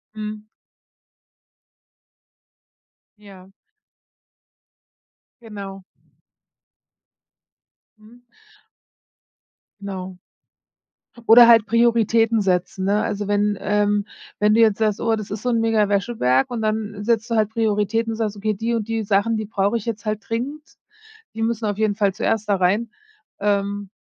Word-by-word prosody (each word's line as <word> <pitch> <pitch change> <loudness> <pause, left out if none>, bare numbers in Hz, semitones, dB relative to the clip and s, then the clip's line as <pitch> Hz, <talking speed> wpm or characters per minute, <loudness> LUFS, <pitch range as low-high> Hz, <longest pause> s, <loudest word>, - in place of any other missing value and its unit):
Mhm. 215 0 -6 2.7
Ja. 195 -2 -15 1.9
Genau. 200 -4 -9 2.2
Mhm. 230 +3 -19 1.6
Genau. 190 -2 -7 1.1
Oder 235 +1 +9
halt 230 -2 +6
Prioritäten 230 -1 +2
setzen, 190 0 -1
ne? 205 +2 +1
Also, 205 -2 -3
wenn, 205 0 +1
ähm 205 0 +1 0.3
wenn 210 0 +3
du 230 - +4
jetzt 215 -2 +3
sagst: 215 -2 0
„Oh, 225 -1 +1
das 215 -2 -7
ist 205 +2 -6
so 250 - 0
'n 230 -1 +1
mega 220 -2 +2
Wäscheberg“ 195 - +1
und 235 -2 -4
dann 215 -1 -3
setzt 230 +1 0
du 230 - 0
halt 215 -1 +2
Prioritäten 225 0 0
und 220 - -6
sagst: 215 -2 -2
„Okay, 215 +1 -2
die 230 +4 -2
und 225 -2 -2
die 225 -1 -2
Sachen, 205 +2 +1
die 215 - -3
brauche 205 +2 0
ich 215 - -8
jetzt 225 -2 -5
halt 215 0 -3
dringend, 265 +7 -4 0.7
die 225 - -4
müssen 230 0 -1
auf 205 -1 -2
jeden 215 -2 +1
Fall 200 -2 +1
zuerst 220 0 -2
da 200 - +3
rein.“ 200 +5 0 0.5
Ähm, 200 0 -1
215 Hz, 130 wpm, -21 LUFS, 200-225 Hz, 2.7 s, Oder